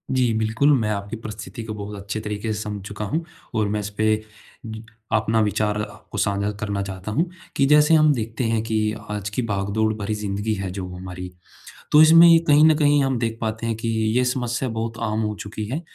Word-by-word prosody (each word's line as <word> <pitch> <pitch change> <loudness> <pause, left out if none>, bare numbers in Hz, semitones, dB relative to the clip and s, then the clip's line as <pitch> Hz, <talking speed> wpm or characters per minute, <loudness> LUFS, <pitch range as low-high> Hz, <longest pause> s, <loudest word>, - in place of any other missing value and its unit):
जी 125 -3 +2
बिल्कुल। 110 +6 +2
मैं 110 -2 -1
आपकी 100 +1 -3
परिस्थिति 110 +1 -8
को 110 -1 -5
बहुत 105 0 -6
अच्छे 100 +1 -5
तरीके 105 +1 -4
से 105 - -2
समझ 105 -2 -5
चुका 105 +1 -5
हूँ 160 +11 -2 0.3
और 110 -2 +1
मैं 105 +1 -1
इसपे, 110 +1 0 1.0
अपना 110 +1 +2
विचार 105 0 0
आप 105 - -9
को - - -5
साझा 100 +1 0
करना 100 -2 -2
चाहता 95 +1 -6
हूँ। 165 +9 0 0.3
कि 135 - +3
जैसे 150 +2 +5
हम 155 -1 +6
देखते 115 -1 -3
हैं 115 -1 +1
कि 110 -1 -1 0.3
आज 105 -1 -3
की 105 +5 -2
भागदौड़ 100 +2 0
भरी 105 0 -3
ज़िंदगी 105 +1 -2
है 95 -3 -4
जो 95 -1 -5
हमारी, 90 0 -7 0.6
तो 150 - +8
इसमें 165 +2 +8
ये 165 -1 +7
कहीं 150 +1 +6
न 160 -1 +6
कहीं 145 -2 +4
हम 135 -2 0
देख 115 -1 -2
पाते 110 +1 -2
हैं 115 - -1
कि 115 +1 -4
ये 110 +2 +1
समस्या 125 0 -1
बहुत 115 0 -4
आम 110 +1 0
हो 105 -1 -2
चुकी 105 +1 -5
है, 135 +10 -3
110 Hz, 210 wpm, -23 LUFS, 105-120 Hz, 1.0 s, तो